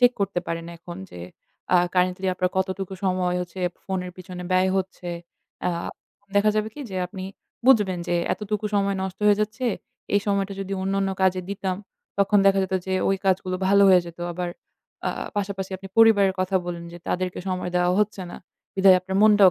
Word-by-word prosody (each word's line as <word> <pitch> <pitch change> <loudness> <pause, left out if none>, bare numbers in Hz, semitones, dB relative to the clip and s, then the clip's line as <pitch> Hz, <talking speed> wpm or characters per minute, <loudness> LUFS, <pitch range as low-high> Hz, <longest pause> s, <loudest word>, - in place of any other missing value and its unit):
Check 245 0 +6
করতে 195 -2 0
পারেন 165 0 -3
এখন। 175 +2 -9
যে - - -10 0.6
আ - - +8 0.2
কারেন্টলি 185 +1 +1
আপনার 180 0 0
কতটুকু 190 0 -2
সময় 180 -1 +1
হচ্ছে 180 +1 -8 0.2
ফোনের 180 -2 -3
পিছনে 180 -1 -8
ব্যয় 185 +1 +4
হচ্ছে? 185 -1 -5 0.6
আ - - +3 0.7
দেখা 215 +1 +5
যাবে 215 0 +1
কি 295 - -8
যে 190 - -4
আপনি 190 0 -7 0.4
বুঝবেন 210 -9 +5
যে 175 - +1 0.2
এতটুকু 210 0 -3
সময় 200 0 +2
নষ্ট 190 -1 -5
হয়ে 205 -1 +6
যাচ্ছে। 220 +4 -1 0.5
এই 205 - +5
সময়টা 200 -1 0
যদি 195 0 -4
অন্যান্য 195 0 0
কাজে 185 -1 +3
দিতাম, 190 -2 -2 0.4
তখন 200 +1 +4
দেখা 195 0 +5
যেত 190 0 -3
যে 190 - -2 0.2
ওই 195 - +2
কাজগুলো 185 -1 +1
ভালো 200 0 +6
হয়ে 185 -1 +7
যেত। 170 0 -10
আবার 175 0 -3 0.6
আ - - +1 0.3
পাশাপাশি 195 -1 -2
আপনি 195 +1 -10
পরিবারের 205 -4 +6
কথা 185 +1 +1
বললেন 170 -1 -4
যে 175 - -9
তাদেরকে 180 0 -1
সময় 185 -1 -2
দেওয়া 180 0 +3
হচ্ছে 210 -2 -1
না, - - -8 0.4
বিধায় 190 -1 +7
আপনার 190 +1 -3
মনটাও 205 -3 +7
190 Hz, 180 wpm, -24 LUFS, 180-200 Hz, 0.7 s, আ